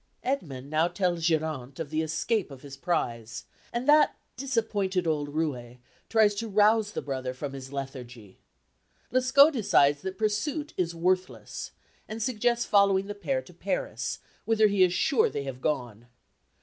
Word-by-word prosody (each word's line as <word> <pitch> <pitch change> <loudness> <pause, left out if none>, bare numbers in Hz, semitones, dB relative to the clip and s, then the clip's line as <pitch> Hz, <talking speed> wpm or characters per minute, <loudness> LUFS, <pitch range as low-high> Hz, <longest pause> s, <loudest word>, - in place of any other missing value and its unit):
Edmund 145 - -3
now 155 +2 +3
tells 175 -2 -1
Geronte 155 -5 -1
of 155 -3 -5
the 155 0 0
escape 185 +6 -1
of 135 -1 -12
his 140 -1 -9
prize, 120 -8 -2 0.3
and 240 +3 -3
that 300 0 +5 0.2
disappointed 215 -8 -1
old 150 -3 -1
roué 130 -6 -3 0.3
tries 220 -2 +4
to 225 +3 -4
rouse 210 +1 +3
the - - -4
brother 130 -2 -4
from 140 +1 -5
his 135 -1 -8
lethargy. 125 -7 -8 0.7
Lescaut 265 +4 +6
decides 155 - +3
that 190 0 -5
pursuit 270 +9 -1
is 170 -2 -1
worthless, 185 +2 -1 0.4
and 215 +1 -5
suggests 235 +1 0
following 200 -2 +4
the 205 - -5
pair - - -2
to - - -16
Paris, - - -3 0.3
whither 220 -1 +3
he 200 -2 +2
is 180 -1 +6
sure 440 - +2
they 140 - -4
have 130 -2 -7
gone. 120 -7 -3
180 Hz, 155 wpm, -28 LUFS, 140-220 Hz, 0.7 s, Lescaut